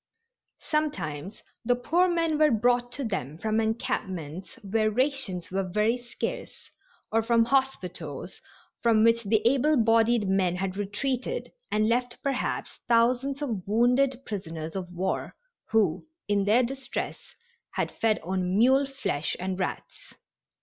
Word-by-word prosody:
Sometimes 220 Hz, -, -2 dB, 0.2 s
the 245 Hz, +1 st, +3 dB
poor 330 Hz, +9 st, +2 dB
men 330 Hz, -3 st, +1 dB
were 305 Hz, -1 st, +6 dB
brought 245 Hz, +1 st, +2 dB
to 280 Hz, -, -4 dB
them 160 Hz, -, -3 dB
from 220 Hz, +4 st, 0 dB
encampments 190 Hz, -6 st, -3 dB
where 215 Hz, +2 st, +1 dB
rations 240 Hz, -, -1 dB
were 195 Hz, +1 st, 0 dB
very 215 Hz, +6 st, +1 dB
scarce 240 Hz, 0 st, -6 dB, 0.4 s
or 225 Hz, -, +3 dB
from 230 Hz, 0 st, +3 dB
hospitals 185 Hz, -, -2 dB, 0.4 s
from 225 Hz, -2 st, +4 dB
which 230 Hz, 0 st, +4 dB
the 220 Hz, +1 st, +2 dB
able 275 Hz, +4 st, +3 dB
bodied 225 Hz, -1 st, +3 dB
men 190 Hz, -2 st, +2 dB
had 185 Hz, 0 st, -2 dB
retreated 210 Hz, +6 st, -2 dB, 0.2 s
and 215 Hz, 0 st, +2 dB
left 245 Hz, +1 st, 0 dB
perhaps 275 Hz, -2 st, -2 dB
thousands 250 Hz, +4 st, +2 dB
of 225 Hz, -9 st, -2 dB
wounded 250 Hz, +4 st, +3 dB
prisoners 165 Hz, -5 st, -5 dB
of 180 Hz, -2 st, -4 dB
war, 185 Hz, +2 st, -2 dB, 0.3 s
who, 205 Hz, -, +1 dB, 0.2 s
in 205 Hz, -1 st, +2 dB
their 225 Hz, +5 st, +4 dB
distress, 265 Hz, +2 st, -5 dB, 0.4 s
had -, -, -1 dB
fed 220 Hz, -1 st, +1 dB
on 185 Hz, +1 st, -1 dB
mule 265 Hz, +5 st, +5 dB
flesh 255 Hz, -, -2 dB
and 185 Hz, +1 st, -3 dB
rats. 185 Hz, -, -5 dB
225 Hz, 135 wpm, -27 LUFS, 190-255 Hz, 0.4 s, were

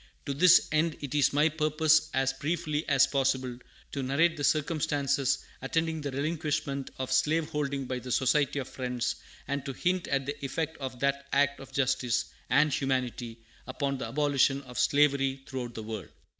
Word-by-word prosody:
To 140 Hz, -, -2 dB
this 175 Hz, +5 st, +6 dB
end 155 Hz, +1 st, +1 dB
it 145 Hz, -2 st, -5 dB
is 145 Hz, -3 st, +3 dB
my 150 Hz, +2 st, +4 dB
purpose, 155 Hz, 0 st, +2 dB
as 135 Hz, 0 st, +1 dB
briefly 155 Hz, +2 st, -2 dB
as 135 Hz, -1 st, +5 dB
possible, 130 Hz, -2 st, 0 dB, 0.4 s
to 140 Hz, -, -3 dB
narrate 155 Hz, +6 st, +2 dB
the 145 Hz, -, -5 dB
circumstances 145 Hz, -3 st, +1 dB, 0.2 s
attending 160 Hz, +3 st, -1 dB
the 145 Hz, -, -3 dB
relinquishment 145 Hz, -1 st, -2 dB
of 130 Hz, 0 st, -4 dB
slave 155 Hz, +4 st, +2 dB
holding 140 Hz, -2 st, -2 dB
by 130 Hz, 0 st, -3 dB
the 125 Hz, 0 st, -7 dB
Society 140 Hz, +3 st, +2 dB
of 135 Hz, -2 st, -3 dB
Friends, 125 Hz, -2 st, -3 dB, 0.3 s
and 140 Hz, 0 st, -2 dB
to 135 Hz, -1 st, -5 dB
hint 180 Hz, +6 st, 0 dB
at 135 Hz, -1 st, 0 dB
the 145 Hz, +1 st, -5 dB
effect 160 Hz, +4 st, -2 dB
of 130 Hz, -2 st, -6 dB
that 140 Hz, 0 st, 0 dB
act 140 Hz, 0 st, +2 dB
of 135 Hz, -, -11 dB
justice 125 Hz, -3 st, +1 dB, 0.2 s
and 145 Hz, +2 st, +4 dB
humanity 125 Hz, -3 st, -2 dB, 0.3 s
upon 140 Hz, +1 st, -2 dB
the 115 Hz, -, -3 dB
abolition 140 Hz, +1 st, +2 dB
of 125 Hz, -2 st, -7 dB
slavery 140 Hz, -2 st, +2 dB
throughout 125 Hz, -3 st, -5 dB
the 110 Hz, -, -5 dB
world. 105 Hz, -6 st, -6 dB
140 Hz, 170 wpm, -29 LUFS, 130-150 Hz, 0.4 s, this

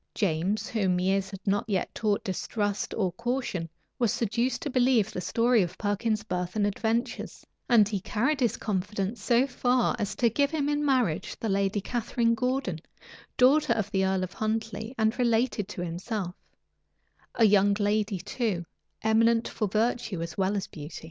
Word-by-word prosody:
James, 190 Hz, +2 st, 0 dB
whom 190 Hz, -5 st, +1 dB
years 190 Hz, +1 st, +1 dB
had 195 Hz, -1 st, -10 dB
not 200 Hz, +1 st, +1 dB
yet 190 Hz, -3 st, -1 dB
taught 210 Hz, -3 st, 0 dB
distrust 205 Hz, +2 st, -2 dB
or 190 Hz, -5 st, 0 dB
caution, 235 Hz, -7 st, -3 dB, 0.3 s
was 235 Hz, -4 st, +2 dB
seduced 235 Hz, +5 st, -1 dB
to 295 Hz, -, -2 dB
believe 245 Hz, -4 st, +3 dB
the 180 Hz, -, -3 dB
story 230 Hz, +5 st, +3 dB
of 175 Hz, -2 st, -3 dB
Perkin's 215 Hz, +1 st, -1 dB
birth 180 Hz, -2 st, -3 dB
and 210 Hz, -1 st, +2 dB
adventures; 225 Hz, +4 st, -2 dB, 0.2 s
and 225 Hz, -4 st, +6 dB
he 205 Hz, -2 st, -2 dB
carried 235 Hz, +9 st, 0 dB
his 240 Hz, -5 st, +1 dB
confidence 205 Hz, +1 st, -2 dB
so 240 Hz, +5 st, +3 dB
far 250 Hz, -2 st, +1 dB
as 205 Hz, -1 st, -2 dB
to 235 Hz, -, +3 dB
give 280 Hz, +5 st, +2 dB
him 295 Hz, -2 st, -1 dB
in 295 Hz, 0 st, 0 dB
marriage 255 Hz, -, +1 dB
the 225 Hz, -, -2 dB
lady 195 Hz, +1 st, +1 dB
Catharine 230 Hz, +1 st, 0 dB
Gordon, 250 Hz, -7 st, -1 dB, 0.6 s
daughter 295 Hz, +4 st, +5 dB
of 210 Hz, -2 st, -2 dB
the 190 Hz, -1 st, +1 dB
earl 190 Hz, -1 st, +1 dB
of 185 Hz, -, -5 dB
Huntley, 220 Hz, +2 st, -3 dB
and 220 Hz, +2 st, +1 dB
related 235 Hz, -3 st, +1 dB
to 185 Hz, -4 st, -5 dB
himself; 180 Hz, +2 st, -4 dB, 1.0 s
a 230 Hz, -, +5 dB
young 200 Hz, -1 st, +4 dB
lady 205 Hz, 0 st, +1 dB
too, 195 Hz, -1 st, -2 dB, 0.4 s
eminent 230 Hz, +1 st, +3 dB
for 215 Hz, -, -2 dB
virtue 215 Hz, -3 st, -1 dB
as 165 Hz, -1 st, -6 dB
well 195 Hz, +1 st, +1 dB
as 195 Hz, -, -2 dB
beauty. 150 Hz, +1 st, -9 dB
215 Hz, 170 wpm, -28 LUFS, 195-235 Hz, 1.0 s, and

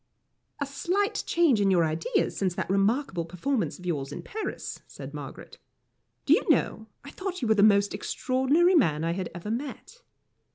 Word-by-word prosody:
"A 285 Hz, -, 0 dB
slight 375 Hz, +9 st, -1 dB
change 315 Hz, -11 st, +3 dB
in 200 Hz, -, +3 dB
your 175 Hz, -3 st, +4 dB
ideas 160 Hz, +1 st, -1 dB
since 185 Hz, -3 st, -1 dB
that -, -, -2 dB
remarkable 195 Hz, -, +1 dB
performance 185 Hz, +9 st, -2 dB
of 180 Hz, -, -13 dB
yours 145 Hz, -5 st, -2 dB
in -, -, -6 dB
Paris," 435 Hz, +1 st, -5 dB
said -, -, -9 dB
Margaret. -, -, -9 dB, 0.7 s
"Do -, -, +6 dB
you -, -, +4 dB
know, 220 Hz, -, +1 dB, 0.2 s
I 280 Hz, -, -10 dB
thought 375 Hz, -6 st, -5 dB
you -, -, +1 dB
were 220 Hz, -, +5 dB
the 210 Hz, -, +2 dB
most 200 Hz, -1 st, +5 dB
extraordinary 265 Hz, -, +2 dB
man 160 Hz, -, +3 dB
I 165 Hz, -, 0 dB
had 180 Hz, 0 st, -3 dB
ever 175 Hz, +5 st, -5 dB
met." 290 Hz, -, -6 dB
215 Hz, 175 wpm, -27 LUFS, 180-285 Hz, 0.7 s, Do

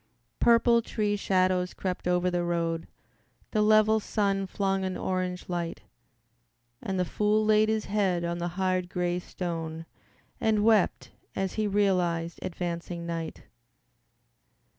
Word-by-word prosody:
Purple 235 Hz, 0 st, +5 dB
tree 210 Hz, -2 st, -1 dB
shadows 185 Hz, -2 st, +1 dB
crept 185 Hz, -2 st, -3 dB
over 180 Hz, 0 st, +2 dB
the 175 Hz, 0 st, 0 dB
road, 165 Hz, -1 st, -1 dB, 0.6 s
The 215 Hz, -, +2 dB
level 215 Hz, +1 st, +5 dB
sun 195 Hz, -2 st, 0 dB
flung 195 Hz, 0 st, -1 dB
an 185 Hz, -1 st, -2 dB
orange 185 Hz, -1 st, -2 dB
light, 175 Hz, -2 st, -3 dB, 1.0 s
And 190 Hz, -1 st, -2 dB
the 180 Hz, -, +2 dB
fool 210 Hz, +4 st, +1 dB
laid 215 Hz, 0 st, +4 dB
his 220 Hz, -1 st, 0 dB
head 195 Hz, -4 st, 0 dB
on 170 Hz, 0 st, -2 dB
the 175 Hz, -, -1 dB
hard, 185 Hz, -1 st, 0 dB
gray 180 Hz, -1 st, -1 dB
stone 165 Hz, -3 st, -5 dB, 0.5 s
And 215 Hz, -2 st, +2 dB
wept 220 Hz, -4 st, +2 dB, 0.2 s
as 195 Hz, -1 st, -1 dB
he 215 Hz, -1 st, 0 dB
realized 180 Hz, -5 st, +1 dB
advancing 170 Hz, -1 st, -4 dB
night. 165 Hz, -1 st, -5 dB
185 Hz, 130 wpm, -28 LUFS, 175-210 Hz, 1.0 s, Purple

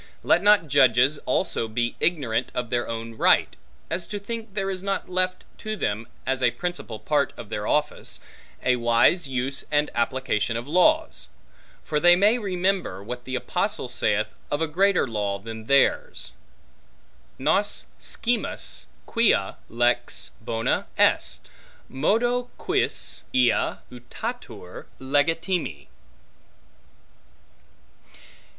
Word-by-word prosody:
Let 175 Hz, -, +4 dB
not 205 Hz, -4 st, +5 dB
judges 135 Hz, 0 st, +4 dB
also 120 Hz, -2 st, +1 dB
be 120 Hz, +2 st, -1 dB
ignorant 140 Hz, -10 st, 0 dB
of 125 Hz, -2 st, -3 dB
their 120 Hz, -1 st, 0 dB
own 115 Hz, 0 st, -5 dB
right, -, -, +4 dB, 0.3 s
as 175 Hz, -, -3 dB
to 205 Hz, -, -4 dB
think 220 Hz, 0 st, -6 dB
there 195 Hz, -1 st, -1 dB
is 185 Hz, -1 st, -4 dB
not 195 Hz, -1 st, -2 dB
left 185 Hz, 0 st, 0 dB, 0.2 s
to 215 Hz, 0 st, -3 dB
them, 110 Hz, -, -2 dB, 0.2 s
as 130 Hz, 0 st, -1 dB
a 125 Hz, -, +5 dB
principal 175 Hz, -7 st, -5 dB
part 145 Hz, +3 st, 0 dB
of 115 Hz, -3 st, -9 dB
their 105 Hz, -1 st, -3 dB
office, 150 Hz, 0 st, -1 dB, 0.4 s
a 125 Hz, -1 st, +3 dB
wise 120 Hz, +8 st, +3 dB
use 135 Hz, +1 st, -2 dB
and 150 Hz, 0 st, +1 dB
application 120 Hz, -2 st, 0 dB
of 120 Hz, +3 st, -6 dB
laws. 310 Hz, -, +2 dB, 0.5 s
For 150 Hz, -2 st, 0 dB
they 175 Hz, +3 st, +7 dB
may 210 Hz, +6 st, +4 dB
remember, 185 Hz, -, -1 dB
what 125 Hz, +3 st, -6 dB
the 130 Hz, -, -3 dB
apostle -, -, -1 dB
saith -, -, 0 dB, 0.2 s
of 145 Hz, -, -1 dB
a 160 Hz, -, +1 dB
greater 190 Hz, +2 st, +2 dB
law 105 Hz, -3 st, -2 dB
than 110 Hz, +2 st, -9 dB
theirs; 140 Hz, -, +2 dB, 1.0 s
Nos -, -, +1 dB
scimus 240 Hz, 0 st, -2 dB, 0.2 s
quia 220 Hz, -, +2 dB
lex 120 Hz, +1 st, 0 dB
bona 115 Hz, 0 st, -1 dB
est, -, -, +2 dB, 0.4 s
modo 240 Hz, -, +1 dB
quis -, -, -1 dB
ea 125 Hz, -1 st, +3 dB, 0.2 s
utatur 120 Hz, -6 st, -7 dB
legitime. 145 Hz, -, 0 dB
140 Hz, 120 wpm, -25 LUFS, 120-185 Hz, 1.0 s, they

